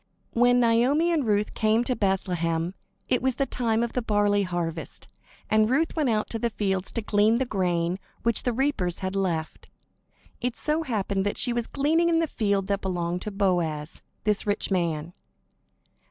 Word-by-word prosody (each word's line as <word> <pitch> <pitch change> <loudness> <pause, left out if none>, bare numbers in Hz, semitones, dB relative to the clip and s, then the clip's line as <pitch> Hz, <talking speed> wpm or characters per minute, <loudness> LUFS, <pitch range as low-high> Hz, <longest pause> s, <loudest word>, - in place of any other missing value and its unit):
When 245 +1 +4
Naomi 250 +8 +3
and 300 -8 +1
Ruth 210 0 +1
came 220 +2 +2
to 250 +1 -1
Bethlehem, 180 -4 0 0.3
it 250 - +1
was 260 -1 +1
the 275 - +1
time 235 -3 0
of 235 - -3
the 250 - 0
barley 205 -2 +2
harvest; 175 -3 -4 0.4
and 215 0 +3
Ruth 315 +6 +1
went 305 -5 +1
out 215 -2 +1
into 225 - -5
the 235 - 0
fields 190 -4 -1
to 230 - -2
glean 210 +1 +3
the 260 +2 +1
grain 180 -4 0 0.2
which 235 -2 +2
the 245 - 0
reapers 235 -9 0
had 185 - -2
left. 170 -5 -2 0.7
It 245 -1 -1
so 300 +8 0
happened 205 -8 -1
that 205 - -2
she 245 - +1
was 235 -1 -1
gleaning 320 +5 +2
in 330 - +3
the 330 - +2
field 200 -8 0
that 200 0 -1
belonged 175 -1 -2
to - - -4
Boaz, 175 -6 -1 0.2
this 210 -1 0
rich 205 0 -1
man. 170 -3 -1
210 Hz, 180 wpm, -26 LUFS, 185-245 Hz, 0.7 s, When